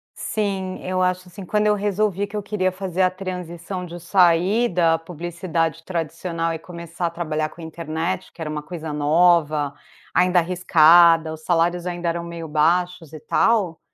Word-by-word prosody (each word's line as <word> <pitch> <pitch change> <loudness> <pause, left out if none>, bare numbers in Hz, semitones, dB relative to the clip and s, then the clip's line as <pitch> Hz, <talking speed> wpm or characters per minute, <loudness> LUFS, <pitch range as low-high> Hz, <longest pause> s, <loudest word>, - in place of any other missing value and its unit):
Sim, 195 -3 -3
eu 185 0 -1
acho, 185 0 0
assim, 190 +1 -10
quando 210 +3 +1
eu 210 - +4
resolvi 205 -1 0
que 205 - -10
eu 210 - -3
queria 195 -2 -1
fazer 185 -1 -3
a 185 - +4
transição 180 -1 -6
de 175 0 -8
sair 180 +5 +3
da 165 -2 +2
publicidade 165 -1 -3
tradicional 165 0 -3
e 160 - -5
começar 170 0 -6
a - - +1
trabalhar 155 -2 -2
com 170 - -14
internet 165 +2 -4
que 170 - -12
era 155 - -3
uma 150 0 -4
coisa 160 0 -6
nova, 150 -1 +2 0.4
ainda 180 0 +4
arriscada, 170 -2 +5
os 160 - -10
salários 175 +1 +1
ainda 175 -1 -2
eram 170 0 -3
meio 170 -1 -7
baixos 165 +1 0
e 155 - -8
tal, 200 -3 +1
175 Hz, 170 wpm, -22 LUFS, 165-185 Hz, 0.4 s, arriscada